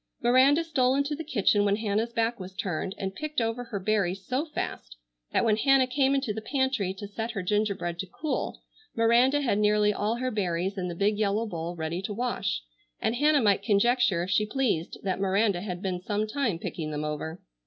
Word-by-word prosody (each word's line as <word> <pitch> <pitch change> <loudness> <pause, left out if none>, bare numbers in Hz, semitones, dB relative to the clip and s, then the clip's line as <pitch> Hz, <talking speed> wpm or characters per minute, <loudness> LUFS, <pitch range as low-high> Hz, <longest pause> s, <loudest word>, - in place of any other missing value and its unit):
Miranda 260 +6 +5
stole 265 -5 +2
into 280 +2 0
the 325 - -6
kitchen 205 -7 +2
when 200 0 +3
Hannah's 215 +2 -1
back 230 0 0
was 185 0 -8
turned 190 -2 -3
and 190 0 -3
picked 305 +6 -3
over 230 +1 -1
her 225 -4 -4
berries 195 -2 0
so 260 - -1
fast 300 - -5 0.4
that - - +2
when 215 -2 +3
Hannah 270 +2 +4
came 265 +2 +2
into 270 -6 -1
the 220 - -5
pantry 265 -6 0
to 205 +1 -7
set 225 +3 -4
her 200 -5 -3
gingerbread 200 -3 -1
to 190 - -3
cool 300 - -4 0.3
Miranda 240 +5 +4
had 230 -7 +1
nearly 210 0 +3
all 210 +3 -1
her 255 +1 -2
berries 190 -2 -1
in 185 -2 -3
the 175 - -5
big 205 +3 +1
yellow 215 +1 +1
bowl 170 -4 -4
ready 165 +2 -3
to 200 +2 -4
wash, 240 - -2 0.4
and 230 - 0
Hannah 295 +1 +4
might 200 -2 +3
conjecture 210 -2 +2
if 185 - -4
she 210 - +3
pleased 215 -9 -1
that 190 -2 -1
Miranda 195 -1 +2
had 180 -2 -5
been 180 -2 -2
some 205 +2 -1
time 220 -4 -1
picking 160 -2 -5
them 150 0 -3
over. 155 +3 -4
210 Hz, 205 wpm, -27 LUFS, 190-245 Hz, 0.4 s, Miranda